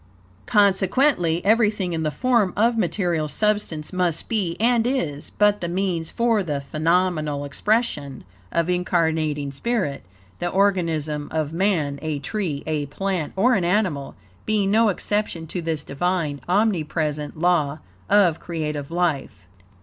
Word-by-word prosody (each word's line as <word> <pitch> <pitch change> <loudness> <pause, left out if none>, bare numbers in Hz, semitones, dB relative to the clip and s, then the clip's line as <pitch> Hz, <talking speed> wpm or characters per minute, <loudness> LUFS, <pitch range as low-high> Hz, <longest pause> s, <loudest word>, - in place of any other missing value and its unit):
Consequently, 195 - +2
everything 210 -4 +2
in 160 - -1
the 155 - 0
form 215 - +1
of 230 +3 +3
material 175 -8 0
substance 205 -4 -1
must 180 -3 -1
be, 195 -7 -1
and 235 +1 +3
is, 165 - -2
but 210 0 +2
the 170 - -2
means 175 -2 -1
for 230 -3 +1
the 150 -6 -2
phenomenal 155 -1 0
expression 145 - -1 0.3
of 170 0 +1
incarnating 160 -5 0
spirit; 185 - -2 0.4
the 175 - -1
organism 165 -6 0
of 155 -1 -2
man, 165 -7 0
a 155 -2 -2
tree, 150 -1 -3
a 150 -2 -2
plant, 180 +1 -2
or 235 +7 +4
an 195 -6 +2
animal, 175 -7 0 0.3
being 205 -2 +1
no 220 +1 +4
exception 205 -4 -2
to 175 +3 -4
this 160 -3 -2
Divine, 155 -1 -1
omnipresent 155 -7 0
law 155 -4 +2 0.3
of 180 -6 +4
creative 150 -4 -4
life. 155 - -1
175 Hz, 135 wpm, -23 LUFS, 155-205 Hz, 0.4 s, or